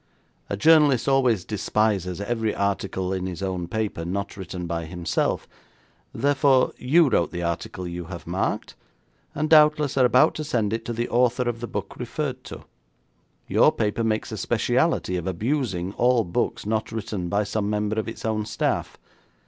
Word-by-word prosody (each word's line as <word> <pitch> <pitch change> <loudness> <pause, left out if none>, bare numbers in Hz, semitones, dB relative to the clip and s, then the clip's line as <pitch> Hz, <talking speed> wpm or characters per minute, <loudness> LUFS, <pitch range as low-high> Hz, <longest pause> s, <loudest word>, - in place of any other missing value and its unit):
A 100 - -2
journalist 145 -2 +5
always 125 -8 +2
despises 105 -3 0
every 110 +1 -1
article 95 -2 -1
in 95 -1 -2
his 90 +1 -5
own 90 -2 -2
paper 105 -3 -3
not 100 +4 -3
written 90 -2 -6
by 85 -1 -3
himself; 85 +1 -1 0.6
therefore, 140 -2 +3
you 155 +6 +4
wrote 100 -9 +2
the 85 -1 -5
article 85 +2 -3
you 85 0 -5
have 85 0 -8
marked, - - -2 0.6
and 155 +1 0
doubtless 150 -2 +5
are 130 - +5
about 125 +1 +4
to 155 - -4
send 115 -8 0
it 115 0 -3
to 120 - -3
the 120 +1 -2
author 125 +1 +2
of 120 -1 -2
the 120 - -5
book - - -5
referred - - -4
to. - - -9 0.8
Your - - +5
paper 105 +2 -1
makes 110 -1 -1
a - - -4
speciality 90 - +1
of 85 - -4
abusing 100 - -1
all 120 0 +3
books 115 +5 -2
not 110 +1 -1
written 105 -5 -4
by 100 +3 +1
some 100 0 -2
member 105 +1 -1
of 110 - -3
its 115 - -7
own 110 -1 -1
staff. - - -2
110 Hz, 170 wpm, -24 LUFS, 95-120 Hz, 0.8 s, journalist